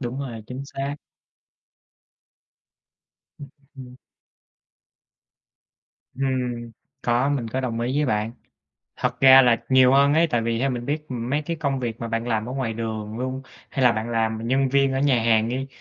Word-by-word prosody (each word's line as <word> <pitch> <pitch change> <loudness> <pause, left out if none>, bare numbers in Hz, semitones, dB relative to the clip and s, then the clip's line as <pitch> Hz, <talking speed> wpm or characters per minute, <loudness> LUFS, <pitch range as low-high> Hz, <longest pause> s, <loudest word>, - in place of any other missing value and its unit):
đúng 125 0 -4
rồi, 120 -5 -6
chính 130 +3 -6
xác. 140 +1 -4 2.4
Ừm 145 - -10 0.3
hưm. 125 -1 -11 2.2
Hừm. 125 -3 -2 0.3
Có, 120 +3 +1
mình 135 -5 -1
có 130 +4 -2
đồng 120 -3 -3
ý 120 +2 -1
với 150 - +1
bạn. 110 -1 -1 0.6
Thật 125 0 -2
ra 135 0 +9
là 120 -2 +2
nhiều 130 -1 +5
hơn 140 +1 +4
ấy, 165 +2 +4
tại 120 -3 +1
vì 115 0 -1
theo 135 +3 0
mình 120 -1 -4
biết, 150 +1 -3
ừm, 120 -1 -4
mấy 145 +2 0
cái 165 +2 -4
công 140 -4 -2
việc 115 -2 -4
mà 115 - -4
bạn 115 +1 -2
làm 110 -1 -1
ở 125 - -5
ngoài 130 -4 -2
đường 110 -1 -5
luôn, 130 +1 -4 0.3
hay 135 -3 0
là 125 - +6
bạn 110 +1 -3
làm 110 -1 -1
nhân 135 +1 +2
viên 135 0 +2
ở 135 - -1
nhà 135 -5 +2
hàng 115 -1 +3
đi. 130 +2 -3
125 Hz, 180 wpm, -23 LUFS, 115-135 Hz, 2.4 s, ra